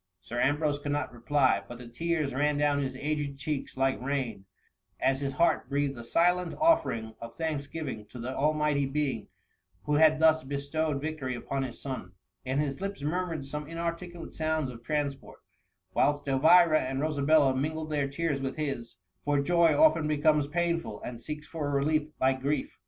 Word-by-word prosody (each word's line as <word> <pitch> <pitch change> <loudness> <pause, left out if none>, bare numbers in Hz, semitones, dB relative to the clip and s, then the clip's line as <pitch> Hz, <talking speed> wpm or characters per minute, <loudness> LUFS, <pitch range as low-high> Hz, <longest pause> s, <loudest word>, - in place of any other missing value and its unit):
'^ - - -56 0.2
Sir 120 - -4
Ambrose 145 +2 +1
could 145 0 -2
not 145 -4 -2
reply, 130 -3 +2
but 120 - -8
the 125 0 -10
tears 155 +3 -1
ran 145 +2 +1
down 145 -1 +2
his 130 -1 -3
aged 145 0 -2
cheeks 140 -1 -4
like 135 -1 +1
rain, 130 -7 -2 0.5
as 135 0 +2
his 140 -1 -2
heart 170 -3 +2
breathed 140 -1 0
a 120 - -8
silent 175 +6 +2
offering 115 - +2
of 115 0 -8
thanksgiving 145 -7 -4
to 125 - -11
the 125 +2 -4
Almighty 150 -1 +1
Being 145 -1 -2 0.6
who 150 - -1
had 155 0 +6
thus 160 0 +5
bestowed 140 +2 -2
vic 155 +1 -4
tory 130 -2 -3
upon 135 +3 -3
his 130 -3 -5
son; 130 -10 -6 0.3
and 130 +2 0
his 140 0 -2
lips 195 -6 -4
murmured 165 -2 -2
some 150 +1 -5
inarticulate 170 +1 -5
sounds 155 -4 -1
of 115 -1 -11
transport; 145 +1 -3 0.6
whilst 145 +1 +1
Elvira 155 +4 +6
and 135 +1 -2
Rosabella 145 -2 +3
mingled 155 +3 -2
their 145 -2 +1
tears 140 0 -2
with 135 0 -3
his, 135 -6 -4 0.3
for 145 0 +2
joy 165 0 +3
often 160 0 +5
becomes 150 -1 +3
painful, 165 -8 -1
and 120 -1 -6
seeks 150 +2 -6
for 155 -3 -4
a - - -1
relief 150 +2 +1
like 130 0 +2
grief. 140 +1 -2
145 Hz, 180 wpm, -29 LUFS, 135-155 Hz, 0.6 s, had